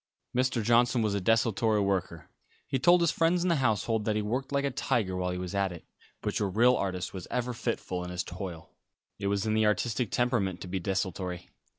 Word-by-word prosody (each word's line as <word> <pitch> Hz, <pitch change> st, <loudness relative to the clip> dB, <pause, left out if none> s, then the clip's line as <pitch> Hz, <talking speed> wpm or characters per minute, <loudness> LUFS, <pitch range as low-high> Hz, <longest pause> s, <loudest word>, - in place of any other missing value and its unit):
Mr. 130 Hz, -2 st, +1 dB
Johnson 120 Hz, +1 st, +3 dB
was 105 Hz, -2 st, +1 dB
a 100 Hz, -, -1 dB
desultory 110 Hz, +1 st, +2 dB
worker. 95 Hz, -5 st, -1 dB, 0.4 s
He 135 Hz, -, -1 dB
told 175 Hz, +5 st, +5 dB
his 170 Hz, -1 st, +3 dB
friends 170 Hz, +2 st, +2 dB
in 180 Hz, -, +1 dB
the 170 Hz, -, +3 dB
household 110 Hz, -3 st, +1 dB
that 110 Hz, -, +1 dB
he 105 Hz, -, 0 dB
worked 125 Hz, +6 st, -2 dB
like 140 Hz, 0 st, +1 dB
a 140 Hz, -, 0 dB
tiger 105 Hz, -6 st, 0 dB
while 90 Hz, 0 st, -1 dB
he 90 Hz, -, -3 dB
was 90 Hz, 0 st, -5 dB
at 100 Hz, -1 st, +1 dB
it, 85 Hz, -2 st, -10 dB, 0.4 s
but -, -, -1 dB
your 100 Hz, -, 0 dB
real 120 Hz, +6 st, +4 dB
artist 90 Hz, -2 st, -2 dB
was 95 Hz, -3 st, -7 dB
ever 125 Hz, 0 st, -1 dB
fitful 110 Hz, -6 st, -3 dB
in 90 Hz, -, -6 dB
his 90 Hz, 0 st, -2 dB
toil. 90 Hz, -3 st, -7 dB, 0.5 s
It 100 Hz, -, -2 dB
was 100 Hz, +1 st, 0 dB
in 110 Hz, -, +1 dB
the 110 Hz, 0 st, +3 dB
artistic 110 Hz, +1 st, 0 dB
temperament 115 Hz, -7 st, 0 dB
to -, -, -6 dB
be 95 Hz, +1 st, -2 dB
desultory. 90 Hz, -1 st, -3 dB
105 Hz, 220 wpm, -29 LUFS, 95-120 Hz, 0.5 s, told